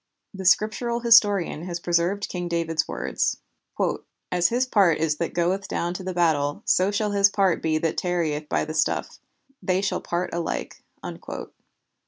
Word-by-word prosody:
The 190 Hz, -1 st, -7 dB
Scriptural 220 Hz, +5 st, +2 dB
historian 205 Hz, -8 st, +4 dB
has 175 Hz, -1 st, -4 dB
preserved 175 Hz, +4 st, 0 dB
King 175 Hz, -1 st, -4 dB
David's 165 Hz, -2 st, -1 dB
words: -, -, -1 dB, 0.9 s
"As 175 Hz, -1 st, +3 dB
his 245 Hz, +4 st, +1 dB
part 195 Hz, -10 st, +3 dB
is 155 Hz, -1 st, 0 dB
that 170 Hz, -, -3 dB
goeth 185 Hz, +3 st, 0 dB
down 175 Hz, +1 st, -2 dB
to 185 Hz, -, -6 dB
the 185 Hz, -, -3 dB
battle, 150 Hz, -4 st, +1 dB
so 185 Hz, +2 st, +3 dB
shall 205 Hz, 0 st, -1 dB
his 200 Hz, 0 st, +4 dB
part 195 Hz, -3 st, +1 dB
be 160 Hz, -1 st, +1 dB
that 160 Hz, 0 st, -1 dB
tarrieth 165 Hz, -5 st, -1 dB
by -, -, 0 dB
the 155 Hz, -, -6 dB
stuff; 155 Hz, -, -1 dB, 0.4 s
they 185 Hz, 0 st, +1 dB
shall 195 Hz, 0 st, -1 dB
part 175 Hz, +1 st, -3 dB
alike." 170 Hz, -1 st, -4 dB
180 Hz, 160 wpm, -24 LUFS, 165-200 Hz, 0.9 s, historian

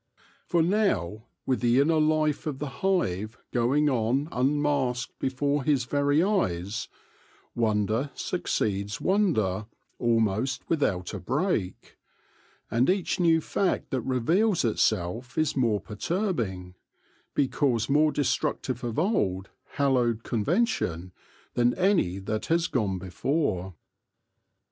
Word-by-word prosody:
For 170 Hz, -2 st, +2 dB
now, 115 Hz, -, 0 dB, 0.2 s
with 130 Hz, -, +1 dB
the 120 Hz, +1 st, +3 dB
inner 155 Hz, +3 st, +3 dB
life 155 Hz, -1 st, +1 dB
of 145 Hz, -3 st, -3 dB
the 140 Hz, -1 st, -7 dB
hive 110 Hz, -, 0 dB
going 130 Hz, +5 st, +2 dB
on 130 Hz, +3 st, +1 dB
unmasked 135 Hz, -1 st, 0 dB
before 140 Hz, +2 st, 0 dB
his 140 Hz, -3 st, +2 dB
very 145 Hz, +5 st, +2 dB
eyes, 100 Hz, -, -1 dB, 0.7 s
wonder 110 Hz, +3 st, 0 dB
succeeds 100 Hz, +1 st, -2 dB
wonder 110 Hz, -, +1 dB, 0.3 s
almost 115 Hz, +2 st, 0 dB
without 100 Hz, -, 0 dB
a -, -, -4 dB
break; 90 Hz, 0 st, -2 dB, 0.7 s
and 120 Hz, +6 st, +2 dB
each 190 Hz, -1 st, 0 dB
new 165 Hz, -2 st, +4 dB
fact 190 Hz, +3 st, -1 dB
that 130 Hz, -3 st, 0 dB
reveals 160 Hz, -, +1 dB
itself 110 Hz, +1 st, 0 dB
is 155 Hz, -1 st, +1 dB
more 115 Hz, -6 st, +2 dB
perturb 175 Hz, -, -2 dB
ing, 90 Hz, -4 st, -4 dB, 0.6 s
because 130 Hz, -4 st, +1 dB
more 150 Hz, +2 st, +3 dB
destructive 130 Hz, -3 st, -1 dB
of 120 Hz, -2 st, -3 dB
old, 100 Hz, -, 0 dB, 0.2 s
hallowed 125 Hz, -5 st, +1 dB
con 110 Hz, -3 st, -1 dB
vention, 105 Hz, -, 0 dB, 0.4 s
than 120 Hz, 0 st, +2 dB
any 180 Hz, -, +2 dB
that 105 Hz, +3 st, -3 dB
has 165 Hz, +1 st, +2 dB
gone 105 Hz, -, -1 dB
before. 95 Hz, -, -2 dB
130 Hz, 115 wpm, -27 LUFS, 110-155 Hz, 0.7 s, new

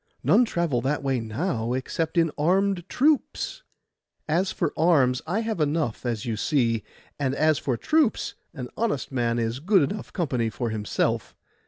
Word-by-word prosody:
None 200 Hz, -, +5 dB
travel 170 Hz, -, 0 dB
that 140 Hz, +3 st, -1 dB
way 135 Hz, -2 st, +1 dB
now, 115 Hz, -, -2 dB
except 160 Hz, +6 st, -2 dB
in 165 Hz, -2 st, +4 dB
armed 185 Hz, +3 st, +1 dB
troops.' 305 Hz, -, +1 dB, 0.7 s
'As 175 Hz, +5 st, +1 dB
for -, -, -1 dB
arms, 140 Hz, -7 st, +3 dB
I 200 Hz, +7 st, 0 dB
have 220 Hz, -7 st, -2 dB
enough, 150 Hz, -6 st, -1 dB
as 115 Hz, -3 st, -2 dB
you 115 Hz, -2 st, -1 dB
see. 115 Hz, -4 st, +1 dB, 0.4 s
And 135 Hz, -1 st, 0 dB
as 155 Hz, 0 st, +3 dB
for 130 Hz, -6 st, -1 dB
troops, 305 Hz, -, +1 dB, 0.2 s
an 125 Hz, -6 st, -7 dB
honest 215 Hz, -, -1 dB
man 120 Hz, -2 st, 0 dB
is 115 Hz, +1 st, -1 dB
good 180 Hz, -1 st, +3 dB
enough 210 Hz, -, -6 dB
company 125 Hz, -, -1 dB
for 115 Hz, 0 st, -3 dB
himself. 105 Hz, -2 st, -1 dB
145 Hz, 160 wpm, -25 LUFS, 120-180 Hz, 0.7 s, None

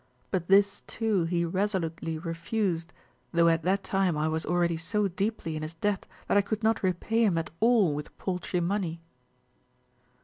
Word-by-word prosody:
But 180 Hz, -3 st, -1 dB
this, 200 Hz, +1 st, +4 dB
too, 215 Hz, -6 st, 0 dB
he 170 Hz, 0 st, 0 dB
resolutely 170 Hz, -3 st, -1 dB
refused, 170 Hz, +1 st, -2 dB, 0.4 s
though 170 Hz, 0 st, +4 dB
at 165 Hz, 0 st, +2 dB
that 190 Hz, +4 st, +1 dB
time 190 Hz, -4 st, +1 dB
I 155 Hz, +1 st, +1 dB
was 160 Hz, +1 st, -2 dB
already 175 Hz, -1 st, +2 dB
so 200 Hz, +6 st, 0 dB
deeply 195 Hz, -3 st, -2 dB
in 155 Hz, -, -4 dB
his 155 Hz, +2 st, -6 dB
debt 200 Hz, +3 st, -1 dB, 0.2 s
that -, -, +3 dB
I -, -, +6 dB
could 215 Hz, +2 st, -3 dB
not 225 Hz, 0 st, +2 dB
repay 195 Hz, +5 st, +1 dB
him 195 Hz, -6 st, +3 dB
at 165 Hz, -, -2 dB
all 225 Hz, -8 st, +4 dB
with 150 Hz, +1 st, -6 dB
paltry 180 Hz, -1 st, -2 dB
money." 175 Hz, -2 st, -1 dB
180 Hz, 170 wpm, -28 LUFS, 165-200 Hz, 0.4 s, I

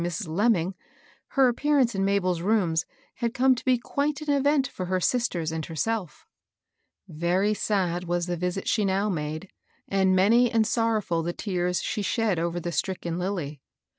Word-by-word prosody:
81 175 Hz, -, -1 dB
Mrs. 190 Hz, +2 st, -4 dB
Lemming, 195 Hz, -3 st, +2 dB, 0.5 s
her 270 Hz, -2 st, +3 dB
appearance 265 Hz, 0 st, +2 dB
in 195 Hz, -1 st, -1 dB
Mabel's 185 Hz, -3 st, +1 dB
rooms 180 Hz, -5 st, +1 dB, 0.3 s
bad 235 Hz, +1 st, -1 dB
come 260 Hz, 0 st, +5 dB
to 250 Hz, -, -6 dB
be 255 Hz, -1 st, +3 dB
quite 285 Hz, +4 st, -2 dB
an 300 Hz, -1 st, 0 dB
event 280 Hz, -1 st, +2 dB
for 185 Hz, -6 st, -6 dB
her 185 Hz, 0 st, 0 dB
sisters 180 Hz, -7 st, 0 dB
and 160 Hz, 0 st, -3 dB
herself. 180 Hz, +1 st, -3 dB, 0.8 s
Very 175 Hz, +6 st, +1 dB
sad 180 Hz, -4 st, -1 dB
was 175 Hz, 0 st, -1 dB
the 175 Hz, 0 st, -2 dB
visit 180 Hz, +2 st, -3 dB
she 215 Hz, -, +2 dB
now 195 Hz, +2 st, +1 dB
made, 155 Hz, +1 st, -4 dB, 0.4 s
and 190 Hz, -1 st, +2 dB
many 230 Hz, +6 st, +5 dB
and 225 Hz, -2 st, +2 dB
sorrow&I 225 Hz, -1 st, +1 dB
tfie 170 Hz, 0 st, -2 dB
tears 180 Hz, -3 st, -1 dB
she 210 Hz, -, -2 dB
shed 200 Hz, -1 st, 0 dB
over 170 Hz, +1 st, -1 dB
the 175 Hz, 0 st, -4 dB
stricken 170 Hz, +1 st, -2 dB
Lilly. 170 Hz, -7 st, -3 dB
190 Hz, 170 wpm, -26 LUFS, 175-230 Hz, 0.8 s, come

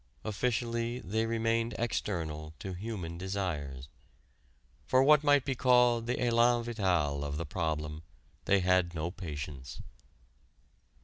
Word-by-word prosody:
Officially 115 Hz, +2 st, -1 dB
they 110 Hz, +1 st, -1 dB
remained 115 Hz, 0 st, 0 dB
external 80 Hz, -9 st, -3 dB
to 95 Hz, -, -6 dB
human 90 Hz, -4 st, -5 dB
desires. 80 Hz, -9 st, -3 dB, 1.0 s
For 130 Hz, 0 st, +4 dB
what 150 Hz, +1 st, +6 dB
might 145 Hz, -2 st, +4 dB
be 135 Hz, -, 0 dB
called 125 Hz, -2 st, +4 dB
the 125 Hz, -, 0 dB
élan 120 Hz, 0 st, +3 dB
vital 90 Hz, -11 st, 0 dB
of 70 Hz, 0 st, -3 dB
the 85 Hz, -, -3 dB
problem 75 Hz, -1 st, -3 dB, 0.4 s
they 100 Hz, -1 st, +3 dB
had 90 Hz, -1 st, +2 dB
no 80 Hz, +2 st, -2 dB
patience. 75 Hz, -7 st, -7 dB
100 Hz, 120 wpm, -31 LUFS, 80-120 Hz, 1.0 s, what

